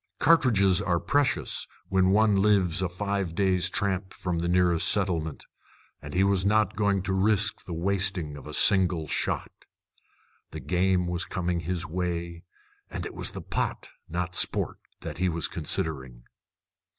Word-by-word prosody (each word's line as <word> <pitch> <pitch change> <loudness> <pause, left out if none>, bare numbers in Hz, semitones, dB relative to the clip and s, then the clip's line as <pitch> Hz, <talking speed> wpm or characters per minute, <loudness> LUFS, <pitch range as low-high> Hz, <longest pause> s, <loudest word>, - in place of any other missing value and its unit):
Cartridges 115 - +4
are 90 -4 +1
precious 145 +6 0 0.2
when 95 -1 +3
one 105 +1 +4
lives 95 -4 +3
a 95 - 0
five 100 -1 -3
days' 95 -1 +2
tramp 95 -1 -2
from 90 -2 -2
the 85 - -1
nearest 90 -1 +2
settlement; 85 -6 -1 0.6
and 70 +2 -8
he 95 - +4
was 100 -1 +2
not 105 0 +2
going 100 -2 +1
to 95 0 -2
risk 100 +1 +1
the 90 - -6
wasting 95 -3 0
of 70 - -10
a - - -7
single 90 -5 +3
shot. - - -2 1.0
The - - -7
game 90 0 +1
was 85 0 -2
coming 90 -1 -2
his 90 +2 -3
way, 85 -1 -3 0.5
and - - -5
it - - -6
was - - -3
the - - -8
pot, - - -3 0.2
not 90 +2 -3
sport, - - -1 0.2
that 75 - -7
he 90 0 +2
was 85 -2 -1
considering. 65 -6 -4
90 Hz, 155 wpm, -27 LUFS, 85-100 Hz, 1.0 s, Cartridges